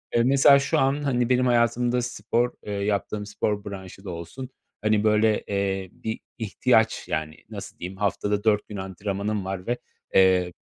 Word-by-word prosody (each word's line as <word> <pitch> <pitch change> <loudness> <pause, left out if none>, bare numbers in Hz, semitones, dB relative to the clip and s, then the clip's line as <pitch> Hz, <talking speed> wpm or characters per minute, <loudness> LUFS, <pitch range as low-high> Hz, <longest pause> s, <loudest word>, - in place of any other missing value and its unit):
Eee, 115 - +4
mesela 140 +2 +6
şu 140 - +1
an, 135 +2 +1
hani, 125 -3 +1
benim 125 0 +3
hayatımda 120 +1 +2
spor, 120 0 0
eee, 105 - -5
yaptığım 100 +1 -1
spor 105 0 -2
branşı 95 -1 -8
da - - -5
olsun, 85 +10 -7 0.3
hani, 110 -1 +2
böyle, 110 0 +3
eee, 95 -1 -1
bir 110 0 -5 0.2
ihtiyaç 110 0 +1
yani. 80 -3 -3
Nasıl - - -8
diyeyim, 95 +2 -6
haftada 105 +1 0
4 105 -2 +2
gün 105 - -7
antrenmanım 100 +2 -3
var 95 0 -5
ve, 120 - 0 0.4
eee, 90 -2 +4
105 Hz, 165 wpm, -25 LUFS, 95-120 Hz, 0.4 s, mesela